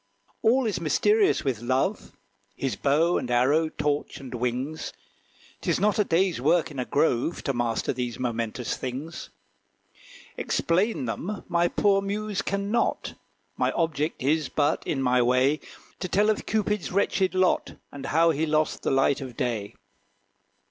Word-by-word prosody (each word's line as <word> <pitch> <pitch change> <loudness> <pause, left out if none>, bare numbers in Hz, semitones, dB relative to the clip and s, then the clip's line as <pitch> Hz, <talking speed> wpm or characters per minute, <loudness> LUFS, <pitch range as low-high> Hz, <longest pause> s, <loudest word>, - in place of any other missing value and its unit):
All 250 +3 +3
is 215 - -1
mysterious 420 -2 +3
with 130 -6 -1
Love, 130 +2 -1 0.4
His 135 -2 -2
bow 155 +5 +2
and 125 - -5
arrow, 140 +7 +3
torch, 145 -1 -2
and 130 -2 -9
wings. 125 +5 -3 0.7
'Tis - - 0
not 210 +2 +2
a - - +5
day's 180 -4 +1
work 160 +3 +2
in 140 - -6
a 125 - -1
grove. 145 +2 0
To 135 - 0
master 120 -1 -1
these 125 -2 -3
momentous 115 -1 -2
things. 135 +6 -6 1.1
Explain 180 - 0
them 180 - -4
my 170 0 +2
poor 195 +2 +2
muse 205 0 -2
can 200 +1 -2
not; 235 +1 0 0.4
My - - +1
object 160 -4 -1
is 150 +1 +1
but, 145 -1 +1
in 135 -3 -1
my 125 -1 +3
way, 130 +5 +3 0.4
To 185 - -3
tell 205 +4 +3
of 215 - -4
Cupid's 210 -3 0
wretched 190 0 +1
lot, 185 -1 +1 0.2
And 135 -1 -7
how 165 +2 +4
he 160 +1 -1
lost 155 0 +1
the - - -1
light 135 +1 +2
of 130 -3 -8
day. 115 -7 -2
155 Hz, 155 wpm, -26 LUFS, 130-190 Hz, 1.1 s, a